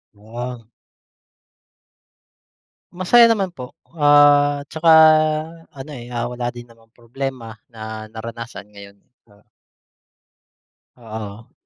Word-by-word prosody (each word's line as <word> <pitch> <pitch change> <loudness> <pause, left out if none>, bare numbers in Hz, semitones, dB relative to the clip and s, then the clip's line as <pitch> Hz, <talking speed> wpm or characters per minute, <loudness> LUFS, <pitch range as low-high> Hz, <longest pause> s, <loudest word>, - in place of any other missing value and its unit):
Ah. 120 +3 -8 2.3
Masaya 185 +7 +4
naman 195 -5 -2
po. 125 -1 -9 0.2
Ah, 145 -1 +4
'tsaka 160 +2 0 0.8
ano, 140 +1 -10
eh, 120 -1 -10
ah, 120 -1 -3
wala 120 0 -4
din 120 0 -12
namang 115 -1 -23
problema 120 -1 -7 0.2
na 110 -1 -9
naranasan 115 -2 -9
ngayon. 100 -1 -15 0.3
Oh. 100 +1 -24 1.5
Oo. 110 -2 -9
120 Hz, 95 wpm, -20 LUFS, 110-145 Hz, 2.3 s, Masaya